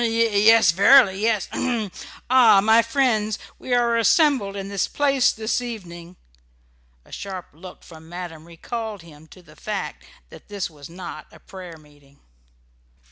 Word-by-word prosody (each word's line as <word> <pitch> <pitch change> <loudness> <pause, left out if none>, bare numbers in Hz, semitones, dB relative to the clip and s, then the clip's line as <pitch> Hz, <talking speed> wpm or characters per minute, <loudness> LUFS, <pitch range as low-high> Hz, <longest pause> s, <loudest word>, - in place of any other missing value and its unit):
"Yes, 225 -3 +4
verily, 200 +1 +5
yes 220 -3 0
h - - -5
m! 230 -6 -2 0.4
A 235 -5 +6
my 220 +3 +4
friends, 230 -3 0 0.2
we 255 - -9
are 235 -1 +2
assembled 245 - +2
in 195 -1 -6
this 200 -2 -2
place 275 -3 +1
this 220 +2 -2
evening 180 -7 -9 0.5
" - - -38
A - - -21
sharp 190 -2 -7
look 180 +4 -13
from 160 -1 -15
madam 175 -3 -8
recalled 210 +4 -7
him 160 -1 -16
to 180 +3 -17
the 155 -2 -19
fact 210 -2 -6 0.3
that - - -15
this 200 -4 -5
was 145 -1 -13
not 170 -3 -9
a - - -17
prayer 180 -4 -11
meeting. 145 -2 -23
200 Hz, 155 wpm, -22 LUFS, 170-230 Hz, 0.5 s, A